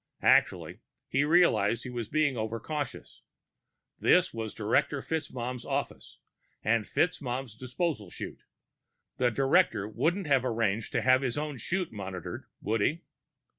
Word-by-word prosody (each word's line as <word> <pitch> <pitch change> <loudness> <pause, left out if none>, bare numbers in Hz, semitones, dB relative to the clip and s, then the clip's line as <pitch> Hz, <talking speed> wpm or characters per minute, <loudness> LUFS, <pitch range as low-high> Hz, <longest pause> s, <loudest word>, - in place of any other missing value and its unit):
Actually, - - +3 0.3
he 135 +2 +2
realized 120 - +3
he - - -6
was 120 -3 -4
being 155 -1 +1
overcautious. 115 +7 -4 0.8
This - - +4
was 110 -3 -5
Director 110 +6 +1
FitzMaugham's 125 -6 -4
office - - -4 0.5
and 110 0 +2
FitzMaugham's 130 - -1
disposal 125 - -3
chute. - - -7 0.8
The 125 -1 +3
director 135 - +2
wouldn't 175 - 0
have 135 -4 +3
arranged 115 -3 0
to - - +1
have 130 +1 +5
his 130 -2 -1
own 150 -2 -3
chute 180 +7 -2
monitored, 95 -4 -6 0.2
would 110 +1 0
he? 155 +10 0
125 Hz, 130 wpm, -29 LUFS, 110-150 Hz, 0.8 s, have